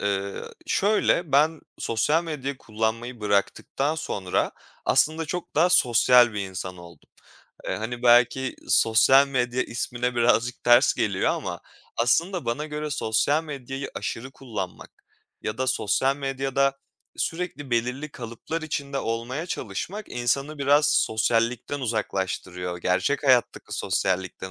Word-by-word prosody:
Iıı, 100 -1 -3
şöyle: 190 -6 +2
Ben 155 +3 +3 0.2
sosyal 150 +9 +1
medyayı 140 -4 -4
kullanmayı 115 +2 -3
bıraktıktan 105 +8 0
sonra 100 - -2 0.3
aslında 160 +1 +2
çok 175 +3 -5
daha 165 +4 +4
sosyal 125 -6 +5
bir 105 - -3
insan 95 -1 -5
oldum. 85 -3 -15 0.6
Iıı, - - -1
hani, 120 +3 -5
belki 125 +2 +4
sosyal 130 +5 +5
medya 125 -1 0
ismine 120 +1 -3
birazcık 120 0 +1
ters 120 +2 +6
geliyor 100 -3 +1
ama - - -4 0.4
aslında 165 +9 +1
bana 120 +6 -2
göre 150 0 -4
sosyal 140 +5 +1
medyayı 135 -2 -6
aşırı 125 +4 -5
kullanmak 105 -10 -7 0.5
ya 110 +2 -4
da 130 - 0
sosyal 130 +2 +1
medyada 135 0 0 0.4
sürekli 165 -5 -3
belirli 125 +5 -1
kalıplar 120 +7 -6
içinde 140 -3 -3
olmaya 120 +8 -3
çalışmak, 180 - -5
insanı 135 +5 -1
biraz 145 +2 +4
sosyallikten 115 +5 +1
uzaklaştırıyor. 95 -6 -3
Gerçek 90 - 0
hayattaki 130 -3 +3
sosyallikten 95 -1 -1
125 Hz, 120 wpm, -25 LUFS, 110-145 Hz, 0.6 s, ters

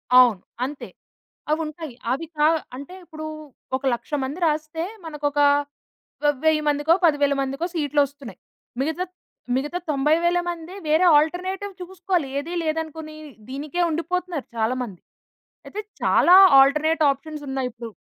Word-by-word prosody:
అవును. 245 -7 +6 0.2
అంతే. 280 +2 -7 0.6
అవుంటాయి. 310 -2 -3 0.2
అవి 275 +6 -2
కా 300 - +5 0.3
అంటే, 280 +7 -9
ఇప్పుడూ 310 -2 -8 0.5
ఒక 260 - -8
1,00,000 240 +5 -10
మంది 280 +6 -5
రాస్తే 310 +1 -1 0.2
మనకొక 295 -2 -3 0.9
వ - - +5 0.2
10౦౦ 315 -1 +3
మందికో, 295 +3 +3
10,౦౦౦ 290 -3 +3
మందికో 275 +5 -2
సీట్లొస్తున్నాయి. 285 -4 -1 0.4
మిగతా 320 +6 -1 0.5
మిగతా 295 +6 -2
90,000 315 +5 +2
మందీ 340 +1 -6
వేరే 310 +4 +3
ఆల్టర్‌నేటివ్ 370 +6 0
చూసుకోవాలి. 360 -3 -2
ఏదీ 325 +5 -5
లేదనుకునీ 315 -1 -4 0.3
దీనికే 290 +6 -4
ఉండిపోతన్నారు 340 -1 -2
చాలామంది. 225 -4 -2 0.7
అయితే, 420 - -5 0.2
చాలా 355 - +5 0.3
ఆల్టర్‌నేట్ 305 +4 +3
ఆప్షన్సున్నాయిప్పుడు. 270 -5 -5
305 Hz, 115 wpm, -23 LUFS, 275-330 Hz, 0.9 s, అవును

